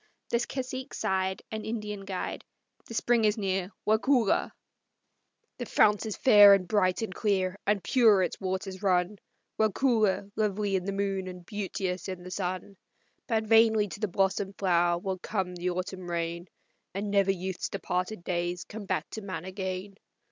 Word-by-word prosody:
The 235 - +2
cacique 260 +1 -4
sighed, 190 0 -1
And 220 -1 -4
Indian 210 -3 -4
guide, 190 -2 -4 0.4
"The 230 - -7
spring 235 0 +2
is 210 0 +3
near, 190 -2 -1 0.2
Waukulla!" 225 +1 +2 1.1
"The - - -4
fount 210 +1 +3
is 215 - -4
fair 205 -5 +8
and 185 -2 -3
bright 185 0 +2
and 215 - -4
clear, 190 -3 0
and 205 -2 +2
pure 220 -7 +5
its 180 - -3
waters 190 0 -3
run; 185 0 +1 0.4
Waukulla, 220 -2 +2
lovely 210 -2 0
in 185 -1 -1
the 200 - -1
moon 195 -1 -2
and 180 -1 -9
beauteous 190 -3 -3
in 185 -1 -6
the 180 - -9
sun. 185 +1 -4 0.5
But 225 -3 +1
vainly 220 -1 +5
to 195 - -8
the 210 - 0
blossomed 195 +1 0
flower 175 -2 +2
will 185 +1 -3
come 190 -2 -2
the 180 +1 -2
autumn 185 0 -4
rain, 170 +1 -3 0.5
And 200 +1 -2
never 200 -1 +3
youth's 190 0 -4
departed 185 0 -3
days 175 0 -2
come 215 -1 -8
back 155 -4 -1
to 220 - -5
man 185 -4 -6
again. 190 +1 -4
195 Hz, 160 wpm, -28 LUFS, 185-210 Hz, 1.1 s, fair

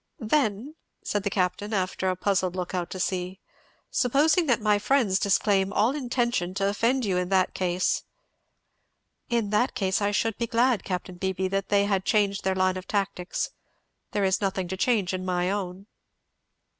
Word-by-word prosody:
"Then," 245 0 0 0.3
said 205 - -1
the 200 - -1
Captain, 195 +2 -1
after 185 0 -1
a 185 - 0
puzzled 185 -1 0
look 180 -1 -4
out 180 -2 -2
to 185 - -6
sea, 185 +1 -2 0.5
"supposing 300 +7 +3
that 245 -3 +3
my 210 -2 +2
friends 210 -4 +2
disclaim 200 -1 +2
all 225 +5 +2
intention 240 -9 -1
to 195 0 +1
offend 230 +5 +1
you 190 -3 0
in 180 0 -1
that 190 -1 +2
case 180 -1 0 0.6
" - - -49
"In 210 -3 -1
that 230 +5 +1
case 190 0 0
I 205 - +2
should 220 +1 -1
be 235 - -1
glad, 235 -2 +2
Capt. 180 -1 -5
Beebee, 190 0 -1
that 195 0 -2
they 200 0 +3
had 195 -2 0
changed 200 -2 +1
their 190 0 +1
line 185 0 +1
of 185 - -8
tactics 195 -3 -2 0.6
there 205 - -1
is 190 +1 +1
nothing 190 -2 -1
to 190 - -2
change 200 -2 +1
in 185 0 -3
my 180 0 0
own." 195 -1 -4
195 Hz, 180 wpm, -26 LUFS, 185-220 Hz, 0.6 s, supposing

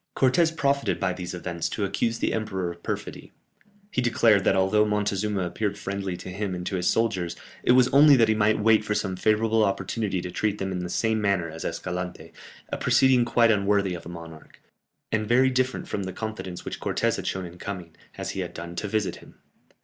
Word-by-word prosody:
Cortès 160 +6 +4
profited 140 -1 +1
by 95 -1 0
these 90 0 -6
events 85 -1 -3
to 105 - -2
accuse 115 +4 -1
the - - 0
emperor 95 -5 -2
of 85 0 -12
perfidy. - - -5 0.6
He 125 - 0
declared 115 -4 +4
that - - +4
although 95 +3 +3
Montezuma 105 -1 0
appeared 100 +3 -2
friendly 95 -2 -4
to - - -8
him 95 0 -3
and 90 0 -6
to 95 - -2
his 90 -1 -1
soldiers, 95 -7 0 0.3
it 125 - +4
was 125 -1 +6
only 145 +1 +7
that 115 -3 +4
he 110 - +3
might 110 0 +2
wait 110 0 +4
for 105 0 -1
some 95 -3 -1
favourable 110 +3 +2
opportunity 100 0 -1
to 90 0 -5
treat 105 +2 -1
them 95 -1 -3
in 90 - -2
the 90 0 -4
same 110 +3 0
manner 95 -5 0
as 80 +1 -7
Escalante, 90 0 -5 0.4
a - - -3
proceeding 130 -2 +4
quite 115 -1 +4
unworthy 100 -2 +2
of 85 - -7
a - - -7
monarch, 85 -2 -11 0.5
and 110 -1 0
very 130 +2 +4
different 130 0 -1
from 100 - -3
the 95 -1 -5
confidence 110 -4 -6
which - - -5
Cortès - - 0
had - - -5
shown 95 -1 -2
in 90 +1 -11
coming, 90 -5 -7 0.2
as - - -4
he - - -5
had 90 -2 -4
done, 85 +1 -7
to 105 - -2
visit 105 -1 -1
him. - - -16
100 Hz, 210 wpm, -26 LUFS, 90-110 Hz, 0.6 s, only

